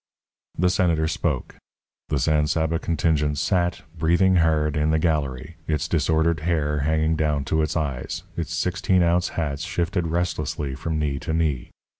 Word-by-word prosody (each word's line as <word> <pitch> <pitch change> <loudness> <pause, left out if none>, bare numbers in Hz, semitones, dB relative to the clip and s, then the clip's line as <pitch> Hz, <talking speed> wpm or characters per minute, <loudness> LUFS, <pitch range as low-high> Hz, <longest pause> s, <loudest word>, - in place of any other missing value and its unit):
The 90 +2 +3
Senator 85 -4 +2
spoke. 80 -4 -2 0.5
The 75 - +1
San 75 +2 +2
Saba 80 0 0
contingent 75 -3 0
sat, 90 +1 0
breathing 85 +4 +3
hard, 80 -2 +2
in 75 0 +1
the 80 - +3
gallery, 75 -1 -1
its 75 -2 0
disordered 80 0 +1
hair 75 -2 0
hanging 80 +2 +1
down 75 -3 0
to 80 +3 +1
its 75 +2 -1
eyes, 70 -5 -3
its 85 0 -3
sixteen 90 +1 +1
ounce 85 +1 +2
hats 75 -3 -2
shifted 90 0 -1
restlessly 80 -4 -2
from 80 +4 -3
knee 70 -2 -1
to 80 +1 -3
knee. 75 -7 0
80 Hz, 155 wpm, -24 LUFS, 75-85 Hz, 0.5 s, The